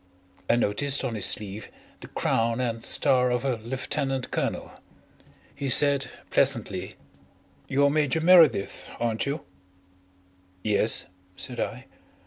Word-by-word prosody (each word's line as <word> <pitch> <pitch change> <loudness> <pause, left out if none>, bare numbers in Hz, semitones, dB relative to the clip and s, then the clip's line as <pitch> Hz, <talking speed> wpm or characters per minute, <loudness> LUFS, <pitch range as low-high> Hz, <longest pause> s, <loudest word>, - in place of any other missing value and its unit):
I - - +5
noticed 135 +5 +1
on 120 - -2
his 105 -3 +1
sleeve 105 0 -3 0.3
the - - -11
crown 115 +1 0
and 115 -2 -2
star 125 0 +3
of 125 +1 -1
a 130 -3 0
lieutenant 130 +3 -3
colonel. - - -3 0.8
He 140 - -4
said 140 +1 +4 0.2
pleasantly: 115 -9 0 0.7
"You're 140 +1 +2
Major 150 0 +1
Meredyth, 165 - +4
aren't 115 +1 -1
you?" 145 +3 -4 1.2
"Yes," 105 +1 +2 0.3
said 125 -2 -5
I. 125 +3 -4
125 Hz, 115 wpm, -26 LUFS, 115-140 Hz, 1.2 s, I